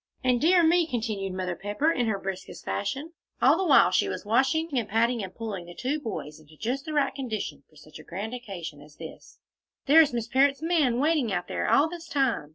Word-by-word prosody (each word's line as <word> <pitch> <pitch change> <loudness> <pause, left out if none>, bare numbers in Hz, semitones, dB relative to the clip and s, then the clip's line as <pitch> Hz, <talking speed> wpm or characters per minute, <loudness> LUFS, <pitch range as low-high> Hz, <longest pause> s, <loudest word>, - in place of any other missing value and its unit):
"And, 250 -2 +2
dear 345 +3 +5
me!" 335 +1 +4
continued 215 - -3
Mother 185 -1 -3
Pepper, 205 - 0
in 245 -7 0
her 215 -2 0
briskest 190 -1 -7
fashion, 275 +11 -3 0.3
all 270 +4 +5
the 380 - -1
while 270 - +6
she 185 - +2
was - - -5
washing 265 +9 +2
and 230 -5 -1
patting 230 +2 +1
and 190 -2 -6
pulling 200 -6 -6
the 175 - -11
two 275 - -2
boys 155 - -6
into 155 0 -19
just 255 - -3
the 310 - -5
right 285 -2 +1
condition 215 - -5
for 155 - -26
such 155 +1 -14
a - - -12
grand 200 +8 -6
occasion 190 -11 -7
as 150 0 -16
this, - - -11 0.5
"there 310 +4 +7
is 300 -2 +3
Miss 235 -2 -3
Parrott's 275 +3 +2
man 310 -8 +2
waiting 295 -5 +1
out 175 -2 -2
there - - -2
all 290 - +4
this 340 0 -9
time! 270 - 0
235 Hz, 220 wpm, -27 LUFS, 190-285 Hz, 0.5 s, there